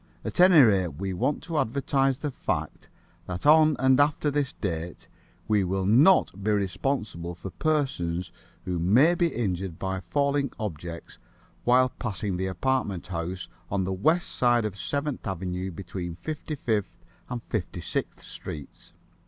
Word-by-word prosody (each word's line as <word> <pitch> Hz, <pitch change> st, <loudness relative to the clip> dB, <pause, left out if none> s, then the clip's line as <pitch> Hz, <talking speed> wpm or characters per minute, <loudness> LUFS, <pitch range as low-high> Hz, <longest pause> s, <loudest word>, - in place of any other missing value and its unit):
At -, -, -4 dB
any 180 Hz, -2 st, +8 dB
rate, 95 Hz, -, +2 dB
we 95 Hz, -1 st, -2 dB
want 140 Hz, +11 st, -1 dB
to 165 Hz, -3 st, -1 dB
advertise 135 Hz, +2 st, +1 dB
the 145 Hz, 0 st, -3 dB
fact -, -, -4 dB, 0.4 s
that 90 Hz, +5 st, -5 dB
on 155 Hz, 0 st, +6 dB
and 130 Hz, 0 st, +4 dB
after 145 Hz, 0 st, +2 dB
this 145 Hz, -2 st, 0 dB
date 85 Hz, -3 st, -5 dB, 0.4 s
we 105 Hz, -2 st, +3 dB
will 95 Hz, +1 st, -1 dB
not 115 Hz, -, +4 dB
be 105 Hz, -, 0 dB
responsible 100 Hz, -4 st, -1 dB
for 95 Hz, +2 st, -8 dB
persons 90 Hz, -, -1 dB, 0.3 s
who 90 Hz, -2 st, -2 dB
may 120 Hz, -, +5 dB
be 175 Hz, 0 st, +2 dB
injured 95 Hz, -, -2 dB
by 95 Hz, 0 st, -2 dB
falling 140 Hz, +8 st, 0 dB
objects 85 Hz, -5 st, -6 dB, 0.5 s
while 130 Hz, +1 st, +5 dB
passing 105 Hz, -6 st, -3 dB
the 95 Hz, +1 st, -1 dB
apartment 100 Hz, -1 st, -1 dB
house 90 Hz, 0 st, -4 dB, 0.2 s
on 100 Hz, -1 st, 0 dB
the 95 Hz, +1 st, -2 dB
west 160 Hz, -, +2 dB
side 120 Hz, -2 st, +2 dB
of 105 Hz, -3 st, -3 dB
Seventh 140 Hz, -, -3 dB
Avenue 95 Hz, 0 st, -3 dB
between 90 Hz, -1 st, -6 dB
Fifty 155 Hz, -, -5 dB
fifth 105 Hz, -9 st, -2 dB, 0.2 s
and 120 Hz, -2 st, -4 dB
Fifty 95 Hz, -5 st, -3 dB
sixth -, -, -4 dB
streets. 75 Hz, -2 st, -9 dB
105 Hz, 150 wpm, -27 LUFS, 90-140 Hz, 0.5 s, any